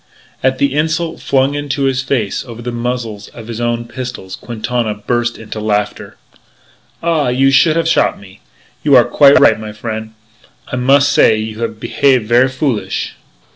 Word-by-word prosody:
At 130 0 +1
the 140 0 +1
insult 160 +2 -1
flung 135 +1 +1
into 145 -1 -2
his 135 -1 +1
face 125 -6 -2
over 120 -2 -10
the 120 - -3
muzzles 120 -3 -4
of 115 -2 -12
his 115 0 -5
own 120 0 -1
pistols, 120 -7 -7
Quintana 120 -1 -3
burst 120 +2 -2
into 110 -1 -7
laughter. 105 -1 -2 0.9
"Ah! 165 -4 +1
You 135 +2 +3
should 155 +4 +4
have 165 -1 +1
shot 165 - +2
me! 100 0 -15 0.4
You 145 -2 +4
are 125 - +7
quite 140 +3 +5
right, 110 - +5
my 110 -1 -7
frien'. 110 0 -6 0.6
I - - -1
mus' 135 +3 +4
say 110 - +4
you 110 0 -5
have 115 -2 -4
behave 125 +2 +2
ver' 120 +4 +3
foolish." 125 -8 -2
120 Hz, 170 wpm, -15 LUFS, 110-135 Hz, 0.9 s, are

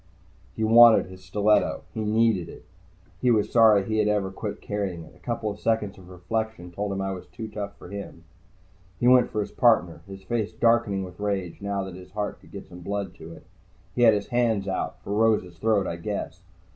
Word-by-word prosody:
He 110 - -2
wanted 115 +1 +7
his 95 0 -13
stiletto. 105 +3 +1
He 110 - -3
needed 110 -4 +2
it. - - -12 0.6
He 125 - +3
was 110 -3 +2
sorry 110 -4 +6
he 110 -1 -1
had 105 - +2
ever 105 -2 0
quit - - -5
carrying 95 -5 -4
it. 80 - -15
A - - -21
couple 110 +1 -3
seconds 105 -2 -1
of 90 -1 -15
reflection 95 +1 -4
told 100 +3 -3
him 95 0 -2
I 95 0 -2
was 95 -2 -7
too 115 -2 -7
tough 100 -2 -6
for - - -12
him. 100 -4 -8 0.8
He 120 - +2
went 125 0 +6
for 105 - -2
his - - -5
partner, 110 -9 +2
his 95 0 -10
face 110 +1 -2
darkening 115 -4 +2
with 90 0 -10
rage 100 -4 -3
now 100 -1 -2
that 95 -1 -7
his 90 +1 -11
heart 105 0 -3
could - - -19
get - - -9
some 90 - -12
blood 100 0 -4
to 80 - -10
it. - - -14 0.5
He 125 - -2
had 115 -3 +7
his 100 - -4
hands 115 -5 +1
out, 95 - -3
for 100 - -4
Rose's 105 -6 +1
throat, 105 -3 +2
I 85 - -4
guess. 100 +4 -5
100 Hz, 210 wpm, -25 LUFS, 95-110 Hz, 0.8 s, wanted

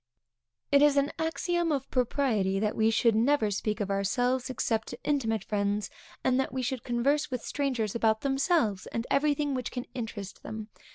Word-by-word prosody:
_ - - -61 0.7
It 280 0 +6
is 290 -1 +5
an 280 +1 +2
axiom 335 +1 0
of 275 -2 -1
propriety 230 -7 +1
that 210 +1 0
we 220 0 +3
should 225 +1 +3
never 225 0 +2
speak 210 +2 -2
of 200 -1 -2
ourselves, 245 +6 0
(except 225 -3 -1
to - - -7
intimate 225 -8 0
friends) 205 0 -1 0.3
and 260 0 +2
that 265 - 0
we 260 0 -2
should 250 0 -2
converse 275 +5 +1
with 250 -3 -4
strangers 255 -8 -1
about 220 -1 +2
themselves, 270 - +1
and 230 +1 -3
everything 290 0 +2
which 255 -2 -2
can 250 -1 -5
interest 215 -5 -6
them. 220 0 -7
245 Hz, 180 wpm, -29 LUFS, 215-280 Hz, 0.7 s, It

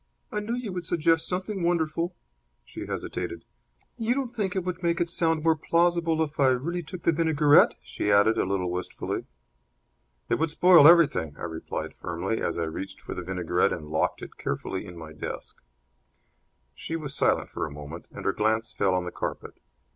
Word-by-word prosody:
"I 210 - -1
knew 220 +3 -2
you 240 -6 -4
would 180 -1 -4
suggest 165 -1 +2
something 190 +2 -2
wonderful." 170 0 0 0.5
She - - -8
hesitated. - - -4 0.5
"You 230 +2 +1
don't 260 -3 -3
think 200 -5 -1
it 190 - 0
would 180 0 -4
make 170 -1 +1
it 170 -1 0
sound 160 -2 +1
more 165 -1 +4
plausible 165 0 +2
if 150 -1 -7
I 135 - +5
really 145 +8 0
took 175 +2 -9
the - - +4
vinaigrette?" 155 -2 +5
she 105 - -2
added, 105 +2 +5
a - - +3
little 90 -2 -1
wistfully. 90 0 -4 1.0
"It - - 0
would 160 +1 +1
spoil 170 -1 +7
everything," 150 - +5
I - - -9
replied, 80 -1 -5
firmly, 90 +5 -3
as - - -1
I 85 - 0
reached 95 +4 -5
for - - -7
the - - -5
vinaigrette 90 -1 0
and 75 -3 -7
locked 80 - 0
it - - -10
carefully 95 +2 -3
in 90 -1 -10
my 80 -1 -9
desk. 75 - -7 1.2
She 165 - -5
was 150 -4 -3
silent - - +1
for - - -3
a - - -10
moment, 75 +3 -9
and - - -9
her 100 - +2
glance 110 +1 0
fell 95 -2 +1
on 90 -1 -1
the 90 - -4
carpet. - - -5
155 Hz, 190 wpm, -27 LUFS, -, 1.2 s, spoil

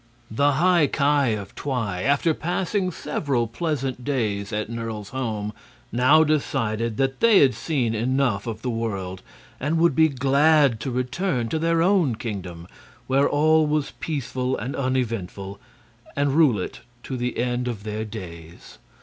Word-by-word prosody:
The 140 +6 +2
High 170 +1 +4
Ki 140 -5 +2
of 100 -2 -8
Twi, 115 -10 -3
after 145 - +2
passing 180 +4 -1
several 140 -7 -1
pleasant 135 0 -3
days 110 -7 -1
at 105 +1 -2
Nerle's 115 -3 -5
home, 110 -5 -3 0.4
now 130 +7 +5
decided 115 -7 -1
that 135 0 0
they 230 -3 +6
had 135 -2 +5
seen 130 -8 -1
enough 120 -2 0
of 110 0 -5
the 125 - -1
world 100 -5 -4 0.4
and 150 +5 0
would 170 -1 +4
be 160 0 +5
glad 140 -1 +3
to 120 - -4
return 125 +1 -1
to 160 - -1
their 165 0 +2
own 180 - +3
kingdom, 90 -7 -6 0.4
where 135 +2 +2
all 155 +1 +3
was 150 -1 -1
peaceful 130 -4 -2
and 125 +6 -4
uneventful, 115 -7 -3 0.6
and 140 -1 +1
rule 145 -8 +4
it 90 - -5 0.2
to 130 - -5
the 125 -1 -3
end 125 0 -1
of 110 -5 -4
their 110 0 -3
days. 85 -6 -10
130 Hz, 150 wpm, -24 LUFS, 110-145 Hz, 0.6 s, they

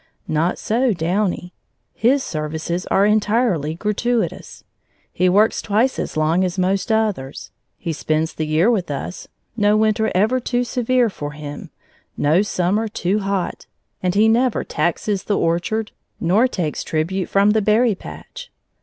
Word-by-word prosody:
Not 160 +3 0
so 240 +2 +1
Downy. 180 +1 -1 0.4
His 260 +4 +2
services 160 +3 -3
are 195 - +3
entirely 210 - +1
gratuitous; 210 +1 -2 0.5
he 180 +1 +2
works 210 +4 +3
twice 225 +6 +1
as - - -4
long 160 +4 +2
as 185 0 -2
most 190 +4 0
others. 210 -12 -1 0.3
He 165 - -4
spends 155 +1 -1
the 155 - -3
year 160 +9 +3
with 190 -8 -1
us, 145 +5 -5 0.3
no 210 -1 +3
winter 220 0 +2
ever 220 +7 +3
too 245 0 -1
severe 245 -1 +1
for 145 -4 -6
him, 145 -1 -8 0.5
no 155 +6 +3
summer 205 +2 0
too 205 -1 -1
hot; 195 -2 -3 0.3
and 180 0 0
he 215 +2 +5
never 240 +2 +2
taxes 190 +3 -1
the 205 - 0
orchard, 175 +6 -1 0.3
nor 200 +9 +3
takes 175 -11 -3
tribute 175 +4 -2
from 200 +1 +4
the 220 0 +2
berry 215 +3 +3
patch. - - -10
200 Hz, 145 wpm, -20 LUFS, 170-220 Hz, 0.5 s, he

